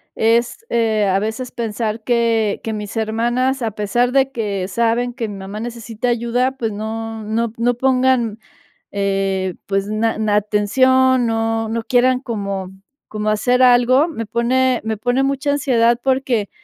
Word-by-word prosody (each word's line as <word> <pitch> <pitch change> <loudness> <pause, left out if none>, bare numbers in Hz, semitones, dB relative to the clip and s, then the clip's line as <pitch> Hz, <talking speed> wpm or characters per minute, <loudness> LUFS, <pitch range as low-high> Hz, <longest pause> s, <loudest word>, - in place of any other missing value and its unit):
es, 235 - +1
eh, 220 -3 +1
a 190 0 +2
veces 220 +4 -4
pensar 220 -1 -3
que 230 -3 +1
que 225 - -3
mis 210 +1 -6
hermanas, 240 +4 0
a 225 -2 -1
pesar 240 +5 0
de 270 0 +2
que 200 -6 -3
saben 235 +3 0
que 235 -3 -3
mi 205 - -7
mamá, 195 +2 -7
necesita 230 0 -5
ayuda, 240 +2 0
pues, 225 -3 -2
no 220 +1 -5
no 225 +2 -1
p - - -26
no 245 +1 +3
pongan, 255 -3 +1 0.5
eh, 195 -2 -1
pues, 195 0 -1
na 220 +1 0 0.2
a - - +4
atención, 255 +5 +3
no 225 0 0
no 230 0 -2
quieran, 255 0 +2
como 200 -6 -4 0.4
como 215 0 -3
hacer 245 +4 +2
algo. 250 +5 +5
Me 230 -9 -5
pone 250 +2 +1
me 220 -1 -2
pone 245 +4 0
mucha 275 +1 0
ansiedad, 240 -4 +2
porque, 260 -6 0
230 Hz, 160 wpm, -19 LUFS, 215-250 Hz, 0.5 s, algo